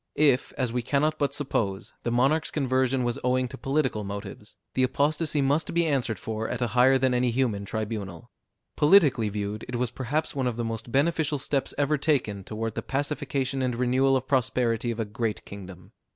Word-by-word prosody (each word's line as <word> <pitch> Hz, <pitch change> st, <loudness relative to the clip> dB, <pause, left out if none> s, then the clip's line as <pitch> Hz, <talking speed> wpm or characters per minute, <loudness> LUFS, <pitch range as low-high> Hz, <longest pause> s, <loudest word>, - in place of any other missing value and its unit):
If, 140 Hz, -3 st, +3 dB
as 125 Hz, -3 st, -1 dB
we 125 Hz, -, 0 dB
cannot 150 Hz, +5 st, 0 dB
but 140 Hz, -2 st, +1 dB
suppose, 115 Hz, -9 st, -2 dB
the -, -, -2 dB
monarch's 135 Hz, +7 st, +2 dB
conversion 130 Hz, -2 st, +1 dB
was 120 Hz, -1 st, -1 dB
owing 125 Hz, 0 st, +2 dB
to -, -, -8 dB
political 135 Hz, -5 st, -1 dB
motives, 100 Hz, +1 st, -8 dB, 0.2 s
the 130 Hz, -, +1 dB
apostacy 145 Hz, +3 st, +1 dB
must 145 Hz, +3 st, +1 dB
be 170 Hz, 0 st, +3 dB
answered 130 Hz, -7 st, 0 dB
for 110 Hz, 0 st, -4 dB
at -, -, -3 dB
a 120 Hz, -2 st, 0 dB
higher 130 Hz, +2 st, +5 dB
than 130 Hz, -1 st, +2 dB
any 125 Hz, 0 st, +2 dB
human 115 Hz, -5 st, 0 dB
tribunal; 105 Hz, -5 st, -5 dB, 0.4 s
politically 145 Hz, -, +5 dB
viewed, 105 Hz, +1 st, -4 dB
it 125 Hz, -, -4 dB
was 120 Hz, -1 st, -1 dB
perhaps 135 Hz, +6 st, -2 dB
one 130 Hz, -2 st, 0 dB
of 120 Hz, -2 st, -2 dB
the 120 Hz, -, -1 dB
most 115 Hz, +1 st, -5 dB
beneficial 150 Hz, +2 st, +1 dB
steps 135 Hz, 0 st, -1 dB
ever 145 Hz, +1 st, +1 dB
taken 125 Hz, -10 st, 0 dB
toward 110 Hz, +2 st, -4 dB
the -, -, -3 dB
pacification 140 Hz, -1 st, -2 dB
and 125 Hz, -2 st, 0 dB
renewal 130 Hz, +2 st, +3 dB
of 130 Hz, 0 st, -5 dB
prosperity 125 Hz, -3 st, +1 dB
of 115 Hz, 0 st, -3 dB
a 115 Hz, -, 0 dB
great 110 Hz, 0 st, -3 dB
kingdom. 95 Hz, -1 st, -10 dB
125 Hz, 190 wpm, -26 LUFS, 115-140 Hz, 0.4 s, higher